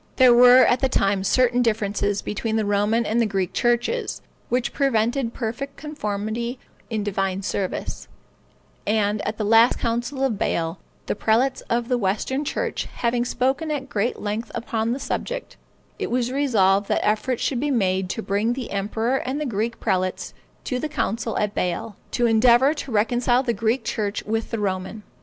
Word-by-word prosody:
There 255 -2 +7
were 250 +1 +8
at 245 - +3
that 265 -2 0
time 195 -1 +1
certain 245 +4 +3
differences 205 -3 0
between 220 +1 -2
the 220 -1 +1
Roman 205 +3 +1
and 230 +3 +1
the 230 - +2
Greek 190 -3 -2
churches, 240 - 0 0.3
which 245 0 0
prevented 240 -2 +1
perfect 265 +4 -4
conformity 235 -4 -3 0.3
in 220 -3 -2
divine 195 -1 -1
service; 190 -1 -3 0.8
and 210 -1 +1
at 215 +1 -3
the 215 - -2
last 225 +3 +5
council 240 +4 -2
of 235 -7 0
Bâle, 165 +1 -1 0.3
the - - -1
prelates 230 +6 +1
of 235 0 0
the 250 -1 +1
Western 220 +8 -1
church 465 - -2
having 240 0 0
spoken 265 +5 0
at 275 -3 -3
great 220 +4 -1
length 215 +2 -3
upon 225 -1 -1
the 255 - -2
subject, - - -4 0.4
it - - -2
was 245 0 0
resolved 205 -8 +2
that - - 0
efforts 220 +4 0
should 255 - 0
be 295 +3 -1
made 190 -7 +1
to 225 - -3
bring 205 +4 0
the 255 -1 -6
emperor 220 +6 0
and 265 +2 -3
the 300 - -2
Greek 230 -1 -2
prelates 185 0 -1 0.3
to 250 - -2
the 310 - -3
council 230 -6 -2
at 210 -1 0
Bâle, 180 +5 -2 0.2
to 240 - 0
endeavor 240 +5 +5
to 285 -4 -6
reconcile 240 +3 +2
the 240 -3 0
Greek 225 +3 0
church 215 -3 -2
with 225 +1 -2
the 230 - -2
Roman. 190 +1 -3
230 Hz, 175 wpm, -23 LUFS, 205-250 Hz, 0.8 s, were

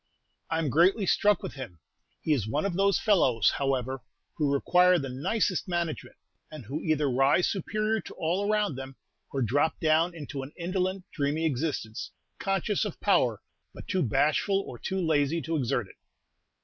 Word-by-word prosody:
"I'm 160 -4 0
greatly 185 - +4
struck 210 +3 +3
with 190 - -5
him. 130 -11 -8 0.4
He 155 - +1
is 115 -8 -1
one 145 - -1
of 200 - -1
those 195 +2 +3
fellows, 135 - +3
however, 135 -1 -1 0.3
who 150 -3 0
require 180 +5 +4
the 135 -5 -3
nicest 185 - -1
management, 170 -3 -3 0.3
and 155 -6 -9
who 140 +7 -4
either 155 -3 +1
rise 135 +7 +3
superior 215 +3 -1
to - - -11
all 180 +6 -1
around 210 -5 +1
them, 135 0 -7 0.3
or 135 -2 -1
drop 145 +8 +1
down 165 +2 +2
into 145 -3 -6
an 135 +2 -9
indolent, 185 +1 -2
dreamy 150 +2 -1
existence, 135 -6 -2 0.3
conscious 195 +1 0
of 210 -5 -5
power, 130 - +2 0.3
but - - -10
too 185 - 0
bashful 155 - +2
or 120 - -9
too 190 - -3
lazy 160 -2 +1
to 165 - -2
exert 120 -5 0
it." - - -17
160 Hz, 165 wpm, -28 LUFS, 135-185 Hz, 0.4 s, greatly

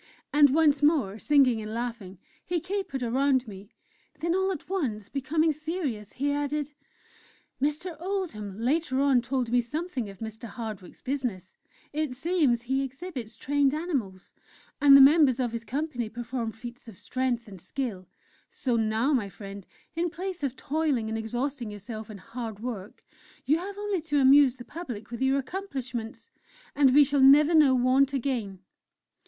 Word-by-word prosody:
And 290 -1 +7
once 295 0 +3
more, 275 -10 +2
singing 265 -6 +3
and 215 +1 -6
laughing, 230 -6 -5 0.3
he 350 -1 -1
capered 360 -7 -3
around 260 +1 +2
me. 200 0 -10 0.5
Then, 335 +3 0
all 380 +1 +1
at 320 -6 -6
once 245 - -2
becoming 310 +4 +1
serious, 300 - -4
he 285 +2 -1
added: 290 0 -2 0.9
"Mr. 310 +5 -1
Oldham 325 - -4
later 260 +2 0
on 275 -3 +4
told 250 -1 -2
me 245 0 +4
something 265 - -4
of 195 - -11
Mr. 220 +2 -7
Hardwick's 215 -4 -8
business. 245 -9 -3 0.4
It 300 -4 -2
seems 280 -6 +1
he 265 +2 0
exhibits 270 -3 -6
trained 285 0 +1
animals; 260 - -4 0.5
and 280 -1 +9
the - - +9
members 275 -2 +6
of 245 -3 0
his 230 0 -4
company 245 -1 -3
perform 235 0 -4
feats 235 +3 -10
of 215 -5 -11
strength 240 +2 -2
and 190 -4 -10
skill. 215 -9 -4 0.4
So 245 -3 -1
now, 225 +5 +1
my 220 -7 0
friend, 195 +1 -10 0.3
in 340 +1 0
place 360 +1 -5
of 270 -2 -1
toiling 285 -7 -1
and 220 - -2
exhausting 240 +2 -3
yourself 215 +1 -8
in 215 - -8
hard 225 +1 -7
work, 220 -4 -7 0.4
you 305 +4 +3
have 400 +3 -6
only 410 -3 -1
to 295 -2 0
amuse 270 -1 +6
the 245 -2 -11
public 250 -11 -7
with 235 - -6
your 265 +1 +3
accomplishments 260 - -5 0.4
and 280 -2 +5
we 290 +3 +7
shall 280 0 +1
never 290 +4 +7
know 295 -5 +6
want 260 +2 +3
again!" 235 -8 -2
260 Hz, 160 wpm, -27 LUFS, 225-295 Hz, 0.9 s, and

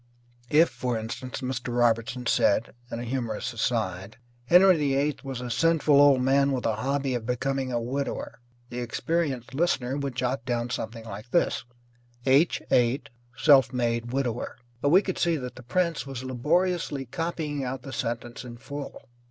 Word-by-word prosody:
If, 160 +4 +5
for 125 -2 -2
instance, 120 +4 -5
Mr. 125 -2 -3
Robertson 120 +1 +1
said 110 -1 +2 0.2
(in 115 - -3
a - - -4
humorous 120 -3 -3
aside), 110 -4 -2 0.3
"Henry 180 +6 +7
VIII 145 -1 +1
was 135 -3 -5
a 125 -1 -4
sinful 155 0 +4
old 140 -3 +6
man 140 +1 +3
with 125 - -2
a 110 -2 +1
hobby 135 +3 -1
of 115 -2 -3
becoming 130 +1 -1
a 120 - 0
widower," 135 +4 -4 0.3
the 120 - -4
experienced 135 +1 -2
listener 135 -4 0
would 140 -3 -3
jot 125 -1 -1
down 120 0 -2
something 115 -1 -5
like 105 +2 -8
this: 170 - +1 0.6
H 140 +5 +3
8, 125 +3 +2 0.3
self 135 -3 +6
made 120 -1 -1
widower. 125 -4 -2 0.2
But 145 - +2
we 185 +6 +6
could 185 - -3
see 170 -1 +2
that 125 -3 -6
the 130 - -11
prince 165 +4 -1
was 130 -2 -6
laboriously 150 +3 0
copying 155 -2 -3
out 130 0 -4
the 135 - -8
sentence 120 +1 -4
in 120 -1 -9
full. 140 +3 -8
130 Hz, 165 wpm, -27 LUFS, 120-145 Hz, 0.6 s, Henry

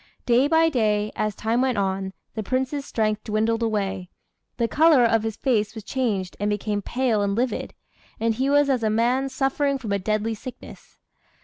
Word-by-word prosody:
Day 245 +3 +4
by 325 +1 +4
day, 215 -6 +1
as 215 -1 -1
time 230 +3 0
went 260 -3 +1
on, 190 -1 -1 0.2
the 220 - -3
Prince's 265 +5 -2
strength 215 -4 -1
dwindled 220 +2 0
away; 195 -5 -2 0.5
the 235 - +1
colour 305 -1 +5
of 225 -1 +3
his 220 -1 -3
face 220 -5 0
was 220 - -7
changed, 210 -7 -2
and 205 +1 0
became 210 0 -1
pale 240 -1 0
and 200 0 0
livid; 245 +3 -2 0.4
and 230 0 +1
he 260 +5 0
was 290 0 +4
as 260 -3 +1
a 220 - +1
man 245 +5 +1
suffering 275 +1 0
from 225 -6 -6
a 200 - +1
deadly 215 +3 -1
sickness. 245 +4 -11
225 Hz, 185 wpm, -24 LUFS, 210-260 Hz, 0.5 s, colour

